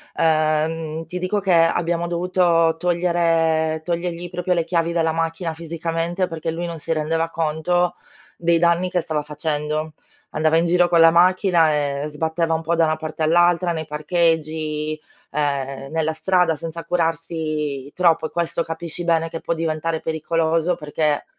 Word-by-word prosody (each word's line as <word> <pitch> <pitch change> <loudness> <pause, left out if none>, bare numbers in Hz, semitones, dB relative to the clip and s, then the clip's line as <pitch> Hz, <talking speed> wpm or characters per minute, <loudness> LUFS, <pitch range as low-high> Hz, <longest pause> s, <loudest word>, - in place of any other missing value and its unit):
Ehm, 160 0 0
ti 180 +3 -5
dico 185 +3 0
che 195 -2 +1
abbiamo 170 +1 +2
dovuto 170 -2 +2
togliere 165 -2 +1
togliergli 175 +1 -3
proprio 180 +1 -1
le 170 -2 +1
chiavi 170 -1 0
dalla 165 -1 +1
macchina 165 +1 -2
fisicamente 165 +2 -2
perché 165 -1 -4
lui 170 +2 -4
non 170 -1 -5
si 165 +2 -2
rendeva 165 +1 -1
conto 165 +2 0 0.4
dei 170 0 +2
danni 170 +2 +2
che 180 -1 0
stava 155 -2 -2
facendo. 150 +1 -3 0.4
Andava 155 +1 +2
in 165 - +2
giro 175 +1 +3
con 170 -1 +3
la 165 0 +8
macchina 175 -2 +4 0.3
e - - -2
sbatteva 160 +2 -1
un 160 - 0
po' 165 +1 0
da 165 -1 +3
una 155 0 +1
parte 155 0 -5
all'altra, 175 +2 +3
nei 160 -1 -4
parcheggi, 155 -1 -1 0.3
ehm, 140 -2 -2
nella 160 0 0
strada 180 0 +2
senza 165 +1 -7
curarsi 155 -4 -2
troppo. 170 -3 +2
E - - -16
questo 170 0 -1
capisci 165 +1 -5
bene 165 -1 +1
che 165 - -6
può - - -1
diventare 160 0 -2
pericoloso 165 +2 0
perché, 150 0 -1
165 Hz, 155 wpm, -21 LUFS, 155-170 Hz, 0.4 s, la